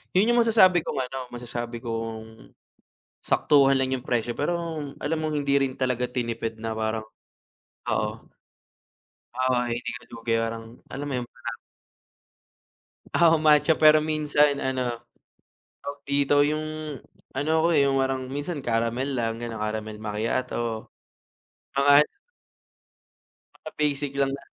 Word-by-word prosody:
Yun 200 +5 +4
yung 240 - +5
masasabi 190 -6 +5
kong - - -3
ano, 135 +1 -5
masasabi 120 -1 -5
kong 115 -1 -6 0.8
saktuhan 140 -2 +4
lang 130 -1 +1
yung 130 -1 -3
presyo 120 -1 -1
pero 160 +4 +1 0.5
alam 160 +2 0
mong 155 -1 -2
hindi 140 -1 +2
rin 135 -2 0
talaga 125 -2 0
tinipid 115 -2 -4
na 115 - -2
parang 110 0 -1 0.9
oo. - - 0 1.2
Uy, 130 -1 +1
hindi 120 - -4
ko - - -4
na - - -19
'to - - -11
babayarang, 115 0 -1 0.2
alam 140 +2 -5
mo 140 - -3
yun, 120 - -6
parang - - -7 1.6
Oo, 165 -1 +5
matcha. 155 +1 +4
Pero 155 0 +7
minsan 150 -2 +2
ano, 130 -3 -1 0.9
tawag 140 0 -6
dito, 140 0 +2
yung, 155 0 -3 0.4
ano 145 - -1
ako 160 - +3
eh, 145 - +5
yung 135 -1 +2
parang 135 0 0
minsan 145 +1 -4
caramel 115 +3 0
lang, 115 -3 -2
ganun, 115 -2 -5
caramel 110 0 -3
macchiato. 110 +1 -2 0.9
Mga 140 +1 +4
an 150 - +2 1.5
mga 155 - -8
basic 145 -1 0
lang 135 -1 +2
na 140 - -14
130 Hz, 135 wpm, -26 LUFS, 115-150 Hz, 1.6 s, Pero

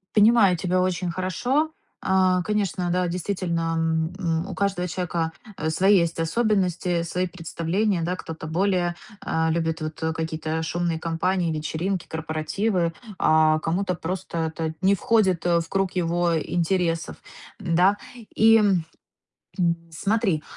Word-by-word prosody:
Понимаю 210 -4 +6
тебя 180 +2 0
очень 180 -1 0
хорошо. 240 - 0 0.3
А, 185 -1 +3
конечно, 190 -3 -1
да, 180 0 +1
действительно, 170 -2 -2 0.4
м, 165 -3 -1
у - - -5
каждого 195 -3 0
человека 165 -1 -2 0.4
свои 190 +5 +4
есть 170 -1 0
особенности, 180 -2 +1
свои 180 +2 -1
представления. 175 +2 -1
Да, 180 +2 -1
кто-то 160 -2 -7
более, 180 0 +1 0.3
э, 160 0 +1
любит, 160 0 -1
вот, 155 0 -5
какие-то 160 0 -3
шумные 170 0 -1
компании, 170 +1 0
вечеринки, 165 +4 -2
корпоративы, 165 +3 -1 0.3
а, 155 0 +4
кому-то 180 +4 -1
просто 180 +1 -4 0.2
это 160 -1 -3
не 195 +1 +5
входит, 190 -5 +2
э, 170 -1 +3
в 165 - -6
круг 195 -1 0
его 175 -1 +1
интересов, 170 0 -1 0.4
да. 180 +4 +3 0.4
И 225 0 +6 1.3
смотри, 195 -1 0
175 Hz, 125 wpm, -24 LUFS, 165-190 Hz, 1.3 s, Понимаю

